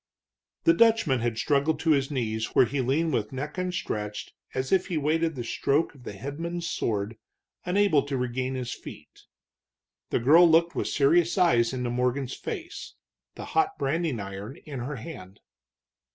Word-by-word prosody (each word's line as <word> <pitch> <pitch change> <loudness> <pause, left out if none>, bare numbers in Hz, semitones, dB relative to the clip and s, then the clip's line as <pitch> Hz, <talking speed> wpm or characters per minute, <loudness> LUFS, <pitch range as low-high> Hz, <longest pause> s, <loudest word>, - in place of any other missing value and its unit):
The 335 - +6
Dutchman 225 - +4
had 115 -1 -1
struggled 145 +5 +1
to 165 - +2
his 135 -2 +2
knees, 110 -5 -2
where - - +7
he 135 +4 -2
leaned 150 +5 +1
with 110 -4 -1
neck 145 +6 -5
outstretched 170 - -4 0.2
as 130 0 -2
if 190 -1 +3
he 175 -4 -2
waited 160 +2 +1
the 120 - -4
stroke 140 +6 0
of 130 -4 -17
the - - -6
headsman's 170 +5 -5
sword, 110 -7 -2 0.5
unable 180 -5 +3
to 140 -2 -2
regain 130 +1 -2
his 125 -2 -3
feet. - - -12 0.8
The - - +1
girl 160 +8 +6
looked 165 +1 +4
with - - -1
serious 165 +6 +3
eyes 120 -11 +4
into 125 -2 -2
Morgan's 125 +2 -1
face, 355 -7 -7 0.4
the - - -7
hot 400 0 +2
branding 155 -3 -1
iron 100 +5 -7
in 140 -4 -6
her 135 +4 -4
hand. 110 - -9
140 Hz, 165 wpm, -27 LUFS, 120-170 Hz, 0.8 s, where